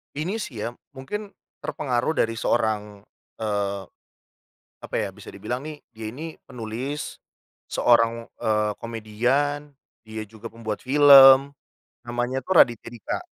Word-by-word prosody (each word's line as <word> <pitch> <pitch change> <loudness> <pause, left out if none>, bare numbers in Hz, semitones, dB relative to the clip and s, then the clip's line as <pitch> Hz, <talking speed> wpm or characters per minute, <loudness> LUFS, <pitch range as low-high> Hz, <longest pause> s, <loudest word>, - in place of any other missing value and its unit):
Ini 180 +10 -2
sih 120 - -6
ya, 120 - -2 0.2
mungkin 205 +11 -5 0.3
terpengaruh 130 +2 -1
dari 115 0 0
seorang, 105 -3 -1 0.4
eee, 100 -2 -1 1.0
apa - - -8
ya, - - 0
bisa - - -12
dibilang 125 +4 -4
nih, 155 -1 -8
dia 110 -2 -8
ini 160 +4 -7
penulis, 125 +5 -5 0.5
seorang, 115 -1 +2
eee, 105 -1 +1
komedian, 125 +7 -1 0.3
dia 110 0 -6
juga 110 +1 -11
pembuat 110 -2 -4
film, 135 0 +8 0.6
namanya 120 +2 -2
tuh 190 - -1
Raditya 120 -6 +4
Dika. 115 -4 -4
120 Hz, 120 wpm, -24 LUFS, 110-140 Hz, 1.0 s, film